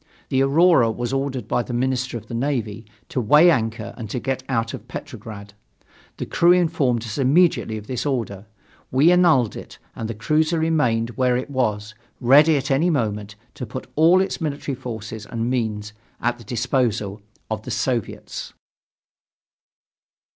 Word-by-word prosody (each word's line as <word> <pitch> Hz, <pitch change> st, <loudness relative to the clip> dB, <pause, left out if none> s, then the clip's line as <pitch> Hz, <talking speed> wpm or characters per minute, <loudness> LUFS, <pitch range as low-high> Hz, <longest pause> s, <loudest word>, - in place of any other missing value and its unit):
The 130 Hz, -1 st, +2 dB
Aurora 140 Hz, -2 st, +4 dB
was 120 Hz, +3 st, -3 dB
ordered 135 Hz, -4 st, -2 dB
by 120 Hz, -, +1 dB
the 120 Hz, 0 st, -5 dB
Minister 130 Hz, 0 st, -1 dB
of 115 Hz, -, -11 dB
the -, -, -9 dB
Navy 115 Hz, -4 st, -2 dB, 0.2 s
to 130 Hz, -, -1 dB
weigh 150 Hz, +10 st, +6 dB
anchor 115 Hz, -4 st, -2 dB
and 115 Hz, -4 st, -7 dB
to 125 Hz, -, -3 dB
get 130 Hz, +1 st, -2 dB
out 115 Hz, -3 st, -1 dB
of 110 Hz, -, -8 dB
Petrograd. 105 Hz, -5 st, -9 dB, 0.6 s
The -, -, -4 dB
crew 170 Hz, +1 st, +4 dB
informed 155 Hz, -10 st, +1 dB
us 110 Hz, 0 st, -5 dB
immediately 140 Hz, -4 st, +3 dB
of 105 Hz, -, -9 dB
this 125 Hz, +1 st, -3 dB
order. 110 Hz, -8 st, -3 dB, 0.4 s
We 140 Hz, +7 st, +4 dB
annulled 165 Hz, -11 st, +4 dB
it -, -, -10 dB, 0.2 s
and 115 Hz, -, -5 dB
the 115 Hz, -, -4 dB
cruiser 155 Hz, +8 st, +1 dB
remained 125 Hz, -8 st, +1 dB
where 125 Hz, 0 st, +1 dB
it 130 Hz, +3 st, -5 dB
was, 110 Hz, -5 st, -1 dB, 0.3 s
ready 145 Hz, +5 st, +6 dB
at 135 Hz, +1 st, -3 dB
any 150 Hz, +6 st, +3 dB
moment 105 Hz, -, -2 dB, 0.2 s
to 125 Hz, -, -7 dB
put 130 Hz, +4 st, -6 dB
all 170 Hz, +5 st, +5 dB
its 190 Hz, -1 st, -3 dB
military 145 Hz, -2 st, -3 dB
forces 110 Hz, -4 st, -7 dB
and 115 Hz, +1 st, -2 dB
means 110 Hz, -4 st, -2 dB, 0.3 s
at 120 Hz, +1 st, -1 dB
the 115 Hz, -, -13 dB
disposal 115 Hz, -3 st, -1 dB, 0.3 s
of 110 Hz, -1 st, -2 dB
the 120 Hz, -, -9 dB
Soviets. 115 Hz, 0 st, -3 dB
125 Hz, 160 wpm, -22 LUFS, 110-140 Hz, 0.6 s, weigh